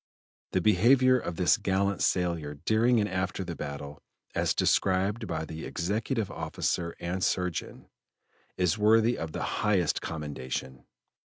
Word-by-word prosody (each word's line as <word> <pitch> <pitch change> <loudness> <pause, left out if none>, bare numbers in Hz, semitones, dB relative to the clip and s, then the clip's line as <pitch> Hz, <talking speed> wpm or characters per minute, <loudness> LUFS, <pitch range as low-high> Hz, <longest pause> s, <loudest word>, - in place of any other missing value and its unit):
The 95 - +2
behavior 125 +7 +5
of 85 -6 -5
this 90 +1 +3
gallant 100 0 0
sailor 85 -5 0
during 110 - +2
and 105 - +1
after 95 0 -2
the 85 -2 -5
battle, 70 0 -7 0.3
as - - +1
described 100 +4 +1
by 80 -2 -3
the 80 +1 -7
Executive 105 +5 -2
Officer 85 -1 -2
and 90 +2 -3
Surgeon, 90 -3 -2 0.7
is 90 +3 +1
worthy 110 +3 +4
of 80 -1 -5
the - - -4 0.2
highest 100 -4 +2
commendation. 65 -4 -5
95 Hz, 130 wpm, -28 LUFS, 80-105 Hz, 0.7 s, behavior